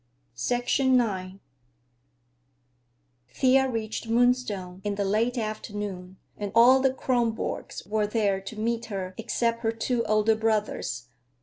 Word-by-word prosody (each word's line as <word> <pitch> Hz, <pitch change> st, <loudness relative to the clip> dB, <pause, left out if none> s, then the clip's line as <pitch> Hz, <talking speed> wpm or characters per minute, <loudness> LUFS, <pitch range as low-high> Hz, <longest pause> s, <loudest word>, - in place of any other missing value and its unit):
IX 240 Hz, -, 0 dB, 2.5 s
Thea 265 Hz, -, +3 dB
reached 225 Hz, -1 st, -4 dB
Moonstone 225 Hz, -7 st, +1 dB
in 205 Hz, -1 st, -2 dB
the 200 Hz, 0 st, -1 dB
late 225 Hz, +5 st, +1 dB
afternoon, 205 Hz, -4 st, -5 dB, 0.2 s
and 205 Hz, -1 st, -5 dB
all 250 Hz, +3 st, +7 dB
the 265 Hz, 0 st, +3 dB
Kronborgs 240 Hz, -3 st, -2 dB
were 210 Hz, 0 st, 0 dB
there 205 Hz, -3 st, 0 dB
to 210 Hz, +2 st, -8 dB
meet 230 Hz, +1 st, -1 dB
her 190 Hz, -4 st, -5 dB
except 230 Hz, +1 st, -1 dB
her 225 Hz, -1 st, +1 dB
two 230 Hz, +1 st, -1 dB
older 215 Hz, +1 st, +3 dB
brothers. 210 Hz, -, -1 dB
220 Hz, 115 wpm, -26 LUFS, 205-235 Hz, 2.5 s, all